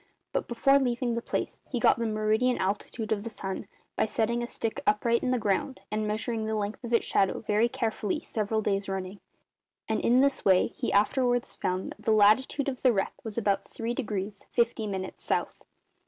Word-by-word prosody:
But -, -, -1 dB
before 275 Hz, +4 st, +4 dB
leaving 245 Hz, -2 st, 0 dB
the 235 Hz, -, -1 dB
place -, -, -3 dB
he 250 Hz, -, -1 dB
got 230 Hz, -, +4 dB
the 230 Hz, -, 0 dB
meridian 220 Hz, +3 st, +1 dB
altitude 210 Hz, +3 st, -2 dB
of 210 Hz, -2 st, +1 dB
the 230 Hz, -, -5 dB
sun, 190 Hz, -3 st, -5 dB, 0.3 s
by -, -, +1 dB
setting 235 Hz, +2 st, 0 dB
a 240 Hz, -, -3 dB
stick 225 Hz, -2 st, -3 dB
upright 230 Hz, +3 st, +3 dB
in -, -, -1 dB
the 255 Hz, -, +2 dB
ground 210 Hz, +4 st, -1 dB
and 215 Hz, 0 st, -1 dB
measuring 220 Hz, +1 st, -2 dB
the 220 Hz, -, -1 dB
length 210 Hz, +2 st, -3 dB
of 240 Hz, -, -5 dB
its 230 Hz, -, +3 dB
shadow 195 Hz, -1 st, +1 dB
very 215 Hz, +2 st, +2 dB
carefully 220 Hz, +1 st, -1 dB
several 220 Hz, -6 st, -2 dB
days 200 Hz, -1 st, 0 dB
running; 190 Hz, +1 st, -4 dB, 0.7 s
and 220 Hz, -, 0 dB
in 245 Hz, +2 st, +4 dB
this 275 Hz, 0 st, +2 dB
way 185 Hz, -2 st, +4 dB
he -, -, -2 dB
afterwards 245 Hz, +4 st, +2 dB
found 185 Hz, +1 st, -2 dB
that -, -, -11 dB
the 220 Hz, -, +2 dB
latitude 215 Hz, +7 st, +4 dB
of 260 Hz, -3 st, -3 dB
the 255 Hz, -, +5 dB
wreck 195 Hz, -4 st, 0 dB
was 220 Hz, -1 st, -6 dB
about 200 Hz, -3 st, +1 dB
3 230 Hz, +1 st, -3 dB
degrees 205 Hz, -5 st, -4 dB
50 235 Hz, -2 st, +1 dB
minutes 190 Hz, -2 st, -5 dB
South. -, -, -2 dB
220 Hz, 200 wpm, -28 LUFS, 205-240 Hz, 0.7 s, the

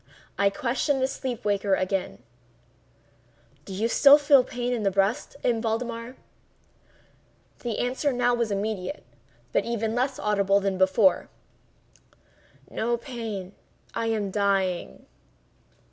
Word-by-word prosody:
I 200 Hz, 0 st, +3 dB
questioned 255 Hz, +6 st, -1 dB
the 260 Hz, -, +2 dB
sleep 255 Hz, -4 st, -5 dB
waker 200 Hz, -1 st, +2 dB
again: 185 Hz, -, -2 dB, 1.4 s
"Do -, -, -9 dB
you 220 Hz, +4 st, 0 dB
still 280 Hz, +4 st, +7 dB
feel 285 Hz, -3 st, +5 dB
pain 245 Hz, -1 st, -3 dB
in 235 Hz, -, -2 dB
the 200 Hz, -, +2 dB
breast, 195 Hz, +10 st, 0 dB
M. 235 Hz, -2 st, +1 dB
Valdemar?" 230 Hz, +2 st, -3 dB, 1.4 s
The 235 Hz, -3 st, -3 dB
answer 260 Hz, +4 st, 0 dB
now 245 Hz, -1 st, +1 dB
was 235 Hz, -2 st, 0 dB
immediate, 205 Hz, +5 st, -3 dB, 0.5 s
but -, -, +2 dB
even 225 Hz, -1 st, -2 dB
less 255 Hz, +2 st, 0 dB
audible 200 Hz, -1 st, +2 dB
than 195 Hz, -1 st, -2 dB
before: 190 Hz, 0 st, +3 dB, 1.4 s
"No 235 Hz, +1 st, -1 dB
pain—I 230 Hz, -2 st, -7 dB
am 215 Hz, -3 st, -1 dB
dying." 195 Hz, -3 st, -1 dB
225 Hz, 115 wpm, -26 LUFS, 200-245 Hz, 1.4 s, still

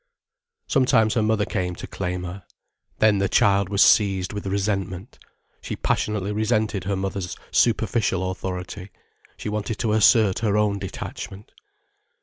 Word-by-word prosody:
Sometimes 125 Hz, -5 st, +3 dB
her 120 Hz, -, +1 dB
mother 110 Hz, -1 st, +1 dB
came 90 Hz, -3 st, -2 dB
to -, -, -7 dB
claim 90 Hz, -1 st, -4 dB
her. 90 Hz, +1 st, -7 dB, 0.5 s
Then 105 Hz, -2 st, +4 dB
the 100 Hz, -1 st, +1 dB
child 100 Hz, -1 st, +3 dB
was 100 Hz, -1 st, +4 dB
seized 95 Hz, -3 st, +3 dB
with 105 Hz, -1 st, -5 dB
resentment. 95 Hz, 0 st, -3 dB, 0.4 s
She -, -, -5 dB
passionately 105 Hz, -2 st, -1 dB
resented 110 Hz, -2 st, 0 dB
her 100 Hz, 0 st, 0 dB
mother's 95 Hz, -1 st, -4 dB
superficial 100 Hz, -5 st, +1 dB
authority. 95 Hz, +1 st, -6 dB, 0.5 s
She -, -, -7 dB
wanted 105 Hz, +1 st, -3 dB
to 110 Hz, -3 st, 0 dB
assert 110 Hz, -2 st, +4 dB
her 105 Hz, -2 st, +1 dB
own 105 Hz, -1 st, +1 dB
detachment. 95 Hz, +1 st, -7 dB
100 Hz, 135 wpm, -23 LUFS, 95-110 Hz, 0.5 s, Then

